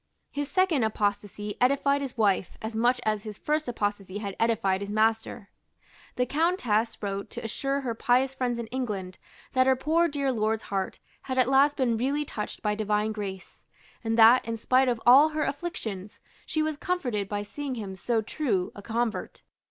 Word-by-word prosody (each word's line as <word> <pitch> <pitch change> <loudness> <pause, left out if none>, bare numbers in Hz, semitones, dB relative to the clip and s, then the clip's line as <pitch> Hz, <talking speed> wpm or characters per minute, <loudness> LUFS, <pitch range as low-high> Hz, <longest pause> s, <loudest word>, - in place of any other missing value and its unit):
His 285 0 -3
second 370 -8 +2
apostasy 205 -1 -2
edified 280 +2 +3
his 270 -3 -5
wife 200 -4 +1
as 220 0 -5
much 245 +2 +2
as 215 -1 +1
his 210 -2 -8
first 305 0 -1
apostasy 205 -4 -2
had 200 -2 -5
edified 220 -4 +1
his 200 - -5
master. 220 -1 0 0.6
The 250 - +1
Countess 250 - +1
wrote 200 0 -3
to - - -7
assure 275 +5 -1
her 245 -4 -2
pious 255 +3 +2
friends 250 -2 -1
in 235 - -4
England 205 -8 -4 0.3
that 255 0 +4
her 265 - +5
poor 320 +6 +2
dear 280 -3 -1
lord's 220 -2 0
heart 195 -1 -3 0.2
had 260 -1 -4
at 255 -2 +4
last 280 +2 +4
been 240 -4 +1
really 280 +5 0
touched 210 -6 -6
by 210 -1 +1
divine 210 0 0
grace, 195 -3 -7 0.4
and 225 0 0
that, 230 +3 +7
in 230 0 -4
spite 255 +4 +3
of 240 -2 0
all 270 +6 +8
her 305 0 -1
afflictions, 225 - -5 0.3
she 310 -1 0
was 310 -1 -2
comforted 245 - -2
by 205 0 -2
seeing 270 +5 -5
him 200 -5 -6
so 220 +4 0
true 210 -7 -1
a 205 - -10
convert. 230 +1 -3
230 Hz, 180 wpm, -27 LUFS, 210-270 Hz, 0.6 s, all